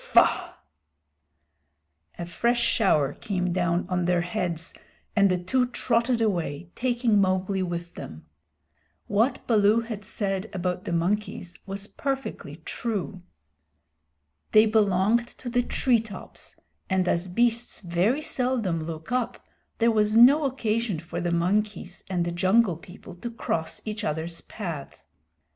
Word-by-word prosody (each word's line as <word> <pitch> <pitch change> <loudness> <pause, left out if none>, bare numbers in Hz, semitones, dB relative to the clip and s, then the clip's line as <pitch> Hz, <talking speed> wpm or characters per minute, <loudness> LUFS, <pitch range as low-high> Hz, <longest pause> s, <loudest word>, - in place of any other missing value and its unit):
Faugh!" - - +3 1.6
A 170 - -4
fresh 235 +8 +1
shower 190 - +2
came 180 -3 -2
down 175 -1 +1
on 180 -1 0
their 175 0 +2
heads 175 -2 -3 0.4
and 200 -2 +5
the 185 - +2
two 250 +8 +1
trotted 240 0 +1
away, 170 -6 -1
taking 240 -4 +2
Mowgli 190 0 +1
with 175 -1 -4
them. 80 0 -9 0.8
What 220 +6 +1
Baloo 215 0 +4
had 225 -3 -6
said 195 -1 -2
about 180 0 -2
the - - -3
monkeys 180 +1 -1
was 195 +1 -4
perfectly 270 - -4
true. 205 -5 -3 1.3
They 215 +1 +8
belonged 215 +2 +3
to 245 - -6
the 245 0 +3
tree 245 0 +2
tops, 215 -4 -9 0.3
and 190 -1 +1
as 175 +1 +1
beasts 235 +5 +1
very 190 - +1
seldom 245 - 0
look 160 +4 -7
up, 245 -1 -1 0.3
there 230 0 +4
was 215 0 +3
no 280 +6 +7
occasion 230 -6 0
for 170 +1 -5
the 175 0 -1
monkeys 185 +1 -1
and 175 -2 0
the 175 - -2
Jungle 185 +1 +3
People 175 +3 -12
to 235 - -5
cross 170 -8 -3
each 215 0 -4
other's 160 +1 -3
path. 170 -10 -7
200 Hz, 135 wpm, -26 LUFS, 175-230 Hz, 1.6 s, They